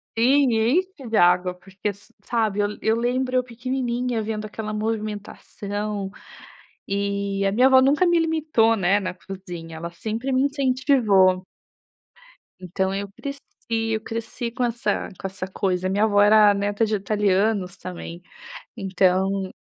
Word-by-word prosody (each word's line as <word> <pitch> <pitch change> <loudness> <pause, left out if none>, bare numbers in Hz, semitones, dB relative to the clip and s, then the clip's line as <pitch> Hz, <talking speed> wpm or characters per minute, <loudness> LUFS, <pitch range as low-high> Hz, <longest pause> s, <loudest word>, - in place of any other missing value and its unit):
Sim, 260 +2 +4
enche 270 - 0
de 220 - +1
água, 180 +1 +4
porque 190 +3 -5
sa 205 +3 -20
sabe, 220 -4 0
eu 205 - +2 0.2
eu 220 - +3
lembro 255 +2 -1
eu 255 - +3
pequenininha 245 -1 -2
vendo 215 0 -4
aquela 215 0 -6
movimentação, 210 -1 -4 0.8
e 200 0 -1
a 195 - +1
minha 250 +5 +5
avó 260 -1 +7
nunca 280 +6 +3
me 345 -1 +3
limitou, 310 -9 +2
né, 195 0 +2
na 190 -3 -4
cozinha, 180 -3 -9
ela 170 +1 -6
sempre 225 +9 -4
me 260 0 +3
incentivou. 255 -9 +3 1.1
Então 190 +1 -2
eu 200 +1 -3
cresci 280 +7 -7 0.3
eu 225 -1 0
cresci 230 +1 -5
com 250 +1 -2
essa 235 -4 -1
com - - -3
essa 190 0 -6
coisa, 185 -1 -1
minha 200 +3 +1
avó 205 -2 +4
era 210 0 +6
neta 205 +2 0
de 215 0 0
italianos 200 -1 0
também, 175 -2 -8 0.6
então 190 -1 +1
210 Hz, 145 wpm, -23 LUFS, 195-240 Hz, 1.1 s, avó